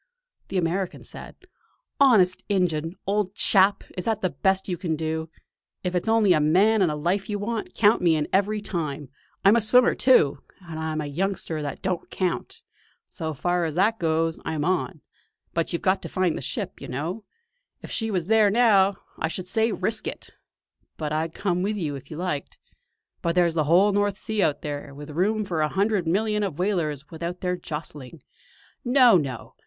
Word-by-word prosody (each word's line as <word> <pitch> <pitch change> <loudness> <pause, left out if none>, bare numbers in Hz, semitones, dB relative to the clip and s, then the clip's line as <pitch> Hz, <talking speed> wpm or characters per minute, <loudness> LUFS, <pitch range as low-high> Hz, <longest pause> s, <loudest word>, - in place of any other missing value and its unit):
The 195 - -3
American 180 +2 -1
said: - - -8 0.6
"Honest 210 -10 +4
injun! 170 -4 0
old 200 -1 -1
chap, 200 -2 +3
is 180 - -4
that 220 -2 -1
the 185 - +1
best 190 +7 +1
you 180 - -1
can 165 -2 -2
do? 160 +1 -3 0.5
If 180 -1 -2
it's 180 +3 -1
only 220 -4 +4
a 155 - +3
man 195 +9 +4
and 180 - +3
a - - -2
life 175 +7 -1
you 205 - -1
want, 220 +2 -4
count 215 +1 +4
me 170 -2 +4
in 150 -1 -1
every 205 +2 +1
time. 150 -7 -4 0.4
I'm 200 +3 +7
a 235 - +3
swimmer, 245 +4 +5
too; 150 - +4 0.2
and 165 -3 -8
I'm 160 -1 -2
a - - -4
youngster 165 +1 -2
that 145 -2 -5
don't 185 -2 -2
count. 185 -2 -3 0.4
So 160 -1 -5
far 175 +4 0
as 155 -2 -3
that 215 +5 +2
goes, 165 -1 0
I'm 155 -2 -2
on. 185 -2 -1 0.5
But 165 -1 -1
you've 170 - -3
got 190 +1 +2
to - - -7
find 185 -3 0
the - - -5
ship, 140 0 -4
you - - -7
know! 165 - -4 0.6
If - - -8
she 225 -1 -1
was 185 -5 -1
there 215 +1 +4
now, 200 -3 +4 0.2
I - - 0
should 180 +2 -6
say 225 +3 +1
'risk 220 +1 -1
it'; - - -6 0.7
and 150 -1 -3
I'd 160 +1 -2
come 180 -3 -1
with 210 +3 -1
you 155 -7 -2
if 135 0 -10
you 155 - -7
liked. 175 -5 -4 0.6
But 170 0 -1
there's 175 -2 +3
the 155 -2 +1
whole 180 +7 +5
North 205 0 0
Sea 220 -1 -2
out 150 -6 +1
there, 145 -1 -5
with 145 +1 -9
room 205 +7 0
for 170 -4 -2
a 155 - +1
hundred 200 -1 0
million 210 +4 +1
of 195 -8 -2
whalers 160 -7 -1
without 170 +2 -5
their 180 -1 0
jostling. 150 -4 -7 0.6
No, 250 -3 +6
no! 135 -7 -4
180 Hz, 190 wpm, -25 LUFS, 160-205 Hz, 0.7 s, I'm